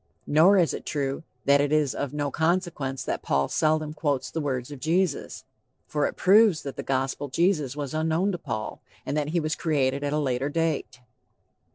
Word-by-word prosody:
Nor 170 +7 +5
is 175 -4 +3
it - - -5
true 140 -1 -2 0.2
that 140 0 +5
it 145 0 0
is 150 -3 +2
of 140 - -3
no 145 -1 -2
consequence 160 -5 -1
that - - -3
"Paul 70 0 +1
seldom 155 -1 +1
quotes 145 -4 -1
the 160 - -2
words 130 -2 -3
of 145 - -8
Jesus." 170 +2 -1 0.4
For 150 -1 0
it - - -6
proves 195 -4 +5
that 140 - -6
the - - -4
Gospel 135 +1 -2
Jesus 150 -2 +1
was 145 -2 -4
unknown 160 +5 +1
to 175 - -4
Paul, 110 -8 -5 0.2
and - - -2
that 150 -1 0
he 170 +2 +1
was 155 -1 -1
created 140 -4 0
at 145 - -1
a 150 - 0
later 135 -1 0
date. 160 -5 -2
150 Hz, 195 wpm, -26 LUFS, 135-160 Hz, 0.4 s, Nor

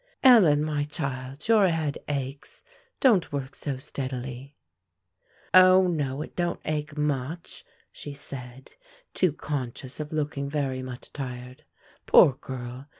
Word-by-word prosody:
"Ellen, 185 - +7
my 150 -1 -1
child, 140 -2 -5
your 220 -4 +5
head 160 -3 -1
aches; 140 -1 -5 0.4
don't 220 -10 +4
work 140 -1 -4
so 140 -3 -4
steadily." 130 +1 -6 1.0
"O, 185 0 +8
no, 150 -5 -1
it - - -12
don't 175 -1 -1
ache 150 -1 -3
much," 150 +2 -3 0.3
said 135 -3 -8
she, - - -26 0.4
too 185 -3 +3
conscious 135 -3 -5
of 150 -1 -5
looking 145 -2 -2
very 140 -3 -2
much 130 -1 -9
tired. 125 -2 -7 0.4
Poor 140 - +7
girl! 130 0 -8
145 Hz, 125 wpm, -26 LUFS, 130-155 Hz, 1.0 s, O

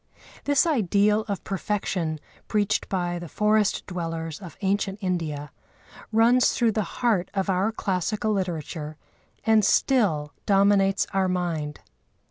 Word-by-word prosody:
This 285 +1 +3
ideal 210 - +2
of 200 -2 -3
perfection 185 -5 -2 0.3
preached 210 -1 0
by 175 -2 -1
the 170 - -7
forest 210 -1 +1
dwellers 165 -3 -4
of 180 -4 -10
ancient 195 0 0
India 160 -7 -3 0.6
runs 235 +3 +4
through 235 -2 +2
the 215 - 0 0.2
heart 200 -7 +2
of 195 0 0
our 190 +4 +1
classical 210 +1 -1
literature 160 -5 -3 0.5
and 220 -1 +4
still 195 - +2
dominates 195 -1 +3
our 190 -1 +2
mind. 170 -5 -2
195 Hz, 120 wpm, -25 LUFS, 175-210 Hz, 0.6 s, runs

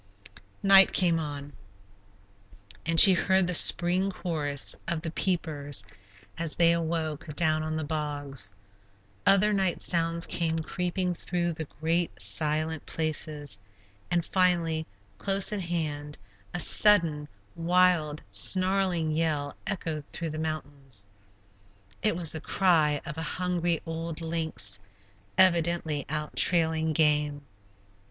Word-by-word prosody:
Night 195 -1 +7
came 170 -3 +2
on, 145 -2 -7 1.3
and 165 -1 +4
she 195 - +11
heard 190 +1 +2
the 180 - -2
spring 175 +3 +5
chorus 150 -7 -2
of 165 -1 -3
the 165 - -4
"peepers," 145 - -2 0.5
as 165 -2 -1
they 170 -1 +4
awoke, 160 -2 -4
down 155 -2 +1
in 155 0 -4
the 160 - -3
bogs. 145 -6 -3 0.8
Other 210 +2 +4
night 190 -3 0
sounds 170 0 +2
came 165 -1 -2
creeping 180 +2 -3
through 175 0 -3
the 160 0 -6
great, 165 - -1
silent 150 +11 -1
places, 150 -6 -3 0.5
and 170 -1 0
finally, 170 -4 0 0.3
close 195 +1 0
at 205 - -3
hand, 150 -4 -4 0.3
a 175 - -4
sudden, 170 -6 +4 0.3
wild, 170 -3 +1
snarling 185 - +2
yell 150 -3 -2
echoed 165 -7 -3
through 165 -2 -5
the 155 - -6
mountains. 140 -8 -4 1.0
It - - +1
was 170 -3 +1
the 160 - -6
cry 160 -7 +1
of 160 -1 -7
a 160 - -4
hungry 175 -2 -1
old 165 0 -5
lynx 160 -12 -4 0.6
evidently 170 -5 +2
out 150 0 -4
trailing 160 -2 +2
game. 150 -2 +1
160 Hz, 120 wpm, -27 LUFS, 150-175 Hz, 1.3 s, she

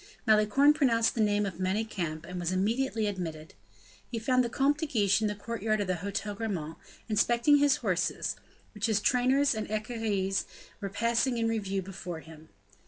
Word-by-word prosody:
Malicorne 220 +7 +5
pronounced 230 -6 +2
the 230 - -1
name 205 -1 +2
of 185 -3 -5
Manicamp, 185 -5 -2
and 180 +2 -6
was 175 0 -1
immediately 225 +4 0
admitted. 165 -6 -5 0.6
He 235 - -4
found 255 +3 +2
the 240 - -2
Comte 280 +5 +1
de 315 - -2
Guiche 205 -6 +2
in 215 - +2
the 210 - -2
courtyard 215 0 -2
of 205 - 0
the 185 -1 -1
Hotel 200 +3 -3
Grammont, 185 -8 -4 0.3
inspecting 235 +6 +3
his 285 -1 +4
horses, 180 -3 0 0.4
which 210 +1 -1
his 215 -2 +2
trainers 260 +5 +3
and 215 -2 -4
equerries 215 -3 -1 0.4
were 200 - -3
passing 235 +4 +1
in 230 -1 +1
review 195 -4 -1
before 180 -3 -7
him. 160 +1 -14
215 Hz, 170 wpm, -29 LUFS, 190-235 Hz, 0.6 s, Malicorne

